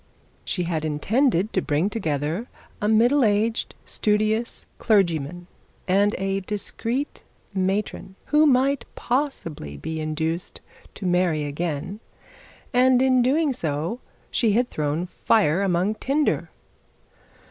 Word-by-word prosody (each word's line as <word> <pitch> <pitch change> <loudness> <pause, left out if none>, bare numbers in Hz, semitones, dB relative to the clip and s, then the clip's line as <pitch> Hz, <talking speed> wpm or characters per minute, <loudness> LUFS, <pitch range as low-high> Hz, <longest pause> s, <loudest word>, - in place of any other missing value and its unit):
She 180 - -1
had 165 -2 -2
intended 200 - +1
to 190 - +2
bring 155 +4 +1
together 165 - -2 0.3
a 210 - +1
middle 240 +6 +4
aged 220 +1 +1
studious 215 +2 0
clergyman, 175 -5 +1 0.4
and 200 +2 +3
a 195 +1 -1
discreet 230 +7 -3 0.3
matron 190 0 -2
who 305 +1 +4
might 275 0 +2
possibly 170 - -2
be 160 - -4
induced 160 +3 -2 0.4
to 200 - -7
marry 175 -4 +2
again; 155 +5 -3 0.7
and 255 0 +5
in 255 -1 +4
doing 280 +3 +2 0.8
she 225 -4 +2
had 245 +3 +1
thrown 150 +3 -1
fire 185 -2 +2
among 190 +1 +1
tinder. 280 +7 0
200 Hz, 110 wpm, -24 LUFS, 165-240 Hz, 0.8 s, and